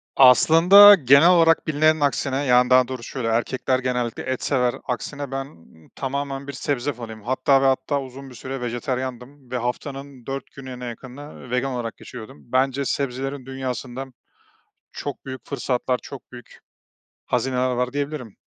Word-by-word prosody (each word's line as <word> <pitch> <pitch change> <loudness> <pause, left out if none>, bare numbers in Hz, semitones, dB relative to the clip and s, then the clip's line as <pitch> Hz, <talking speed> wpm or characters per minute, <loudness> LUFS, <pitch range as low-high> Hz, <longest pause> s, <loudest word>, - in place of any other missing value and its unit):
Aslında 170 +10 +8
genel 140 +1 +5
olarak 165 -2 +4
bilinenin 155 +1 +3
aksine, 140 -1 0
yani, 125 -1 +4
daha 130 -1 +5
doğrusu 130 -2 -7
şöyle, 125 -4 -4
erkekler 125 +3 0
genellikle 125 -2 -2
et 130 -1 -3
sever, 125 -3 +1
aksine 140 +2 -5
ben 135 0 -4 0.5
tamamen 140 0 -4
bir 140 - -6
sebze 145 0 -2
fanıyım. 110 -3 -9
Hatta 130 +3 +2
ve - - +2
hatta 135 +2 +1
uzun 135 +1 -10
bir 125 - -13
süre 130 +2 -6
vejetaryendim 125 +2 -5
ve 125 - -1
haftanın 135 +1 -5
4 135 -1 -6
gününe 130 -2 -9
yakınını 130 +2 -10
vegan 125 +2 0
olarak 120 -2 -5
geçiyordum. 110 -8 -11
Bence 135 +1 +1
sebzelerin 135 0 -3
dünyasında 130 -1 -5 0.9
çok 145 -2 -6
büyük 130 -1 -8
fırsatlar 125 -2 -1
çok 140 -2 -11
büyük 120 -1 -13 0.7
hazineler 130 -1 0
var 125 +1 -2
diyebilirim. 140 -6 -4
130 Hz, 145 wpm, -22 LUFS, 125-140 Hz, 0.9 s, Aslında